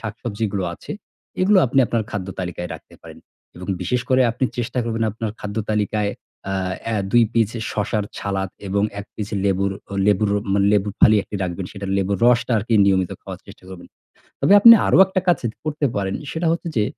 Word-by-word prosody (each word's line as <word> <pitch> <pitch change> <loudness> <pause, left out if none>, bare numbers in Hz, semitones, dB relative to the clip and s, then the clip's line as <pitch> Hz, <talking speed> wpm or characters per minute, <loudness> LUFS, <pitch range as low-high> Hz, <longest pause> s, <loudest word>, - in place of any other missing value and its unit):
শাক-সবজিগুলো 105 -2 -4
আছে, - - -13 0.5
এগুলো 195 +1 +4
আপনি 135 +3 0
আপনার 115 -1 -1
খাদ্য 95 -3 -4
তালিকায় 90 -1 -5
রাখতে - - -14
পারেন - - -12 0.4
এবং 90 - -9
বিশেষ 125 +7 0
করে 130 0 +3
আপনি 120 - -2
চেষ্টা 120 +1 -3
করবেন, 115 -1 -2
আপনার 110 -1 -4
খাদ্য 105 +1 -6
তালিকায় 105 -1 0 0.4
আ 95 - -1 0.4
এ - - 0 0.2
২ 120 -1 +6
পিস 115 -3 +2 0.2
শসার 105 0 -1
সালাদ, 95 -1 -3 0.2
এবং 100 +1 0 0.2
১ 100 - -7
পিস 105 -2 -5 0.2
লেবুর 100 0 +1 0.3
লেবুর 105 0 +2 0.2
মানে, 100 0 +2
লেবুর 105 -1 +1
ফালি 110 - +7 0.3
রাখবেন। 90 +1 -4
সেটা 100 -1 -7
লেবুর 100 0 0
রসটা 125 +1 +3
আর 105 - -3
কি, 115 - +2
নিয়মিত 95 -2 +2
খাওয়ার - - -8
চেষ্টা - - -15
করবেন। 95 -2 -10 0.5
তবে - - +3
আপনি 230 +2 +11
আরও - - +4
একটা 190 0 -1
কাজ 175 - +4 0.3
করতে 150 -1 -1
পারেন। 100 -1 -1 0.2
সেটা 165 +1 -2
হচ্ছে 170 0 -3
যে, 105 - +3
105 Hz, 185 wpm, -21 LUFS, 100-120 Hz, 0.5 s, আপনি